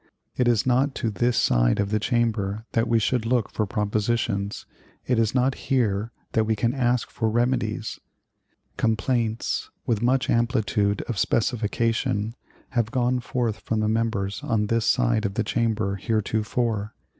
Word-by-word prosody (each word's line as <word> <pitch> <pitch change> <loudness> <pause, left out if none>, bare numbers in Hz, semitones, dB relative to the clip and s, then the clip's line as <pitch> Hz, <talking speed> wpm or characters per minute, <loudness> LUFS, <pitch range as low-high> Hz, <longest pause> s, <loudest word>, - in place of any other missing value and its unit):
It 125 - +1
is 115 -4 +3
not 130 +2 +2
to 115 -4 -1
this 120 +3 +1
side - - +3
of 100 0 0
the 110 - +2
Chamber 110 -3 0
that 115 +1 +1
we 115 - +3
should 115 +2 +1
look 115 -2 0
for 110 - -1
propositions; 105 -1 -1 0.4
it 125 -2 +1
is 115 +1 +1
not 130 +1 +3 0.2
here 115 -4 +1 0.2
that 110 -1 +2
we 110 0 +1
can 115 +3 0
ask 125 -3 0
for 110 -2 -1
remedies. 115 -2 -1 0.8
Complaints, 115 0 0 0.2
with 110 -3 0
much 130 +2 +2
amplitude 110 -4 +1
of 115 - -4
specification, 115 -1 0 0.4
have 120 -4 0
gone 125 +1 +1
forth 120 -2 -2
from 110 - -2
the 105 - +1
members 110 -1 -1
on 115 -7 +1
this 115 +1 0
side 120 -3 +2
of 100 -1 -2
the 115 - +1
Chamber 110 -2 0
heretofore. 110 +1 -1
115 Hz, 155 wpm, -25 LUFS, 105-120 Hz, 0.8 s, is